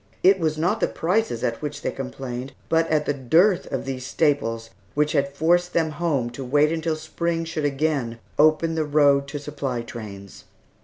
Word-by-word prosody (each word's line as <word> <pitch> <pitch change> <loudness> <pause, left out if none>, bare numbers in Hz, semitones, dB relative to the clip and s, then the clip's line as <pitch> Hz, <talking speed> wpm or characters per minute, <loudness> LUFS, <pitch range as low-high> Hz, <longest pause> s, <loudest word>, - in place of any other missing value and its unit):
It 190 +1 +6
was 155 -2 0
not 165 +3 +1
the - - +2
prices 180 - -1
at 115 - -1
which 150 -1 -5
they - - 0
complained, 130 0 -6 0.2
but 165 0 +3
at 150 -1 +2
the 145 - +1
dearth 165 - +3
of - - -2
these 130 -1 -4
staples, 115 -6 0 0.2
which 150 +1 +2
had 140 -3 +1
forced 175 +4 +2
them 160 -2 +1
home 145 -6 -1
to 135 +3 -7
wait 145 +4 +3
until 160 -1 -1
spring 165 +1 -2
should 160 -2 -3
again 140 -5 0 0.2
open 155 +2 +4
the 160 -1 0
road 145 -2 +3
to 140 - -5
supply 140 -4 -4
trains. 100 -5 -9
150 Hz, 185 wpm, -24 LUFS, 130-160 Hz, 0.2 s, It